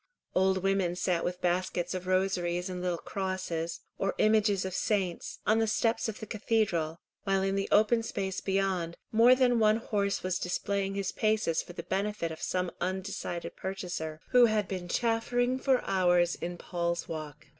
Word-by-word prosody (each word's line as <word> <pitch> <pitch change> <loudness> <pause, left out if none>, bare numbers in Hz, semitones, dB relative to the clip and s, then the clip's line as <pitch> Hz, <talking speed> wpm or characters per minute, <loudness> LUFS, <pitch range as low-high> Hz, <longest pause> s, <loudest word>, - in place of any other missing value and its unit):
Old 190 0 +2
women 195 -3 +1
sat 180 -2 0
with 180 0 -3
baskets 180 0 0
of 185 0 -5
rosaries 185 -1 0
and 180 -1 -4
little 180 -1 -1
crosses, 185 -3 -3 0.2
or 195 - 0
images 210 -3 +3
of 190 - -4
saints, 190 -3 -1
on 220 +1 +4
the 225 - +2
steps 225 +1 +1
of 215 - -6
the 220 - -6
cathedral, 200 -7 0 0.3
while 195 -1 +1
in 195 0 +1
the 195 0 -1
open 220 +2 +4
space 195 -4 -3
beyond, 190 -3 0
more 235 +3 +7
than 250 -2 +3
one 215 0 +4
horse 200 -3 -1
was 185 0 -1
displaying 195 +2 -1
his 200 -1 -1
paces 215 -6 +1
for 175 - -11
the - - -6
benefit 195 -3 -2
of 160 - -8
some 180 -1 -1
undecided 185 -1 -3
purchaser, 175 -5 -4
who 250 -1 +7
had 215 -3 +1
been 185 -2 -4
chaffering 245 +4 +1
for 260 -1 +2
hours 175 -2 +3
in 175 +1 -5
Paul's 170 -1 -2
Walk. 155 -2 -7
190 Hz, 170 wpm, -30 LUFS, 175-215 Hz, 0.3 s, more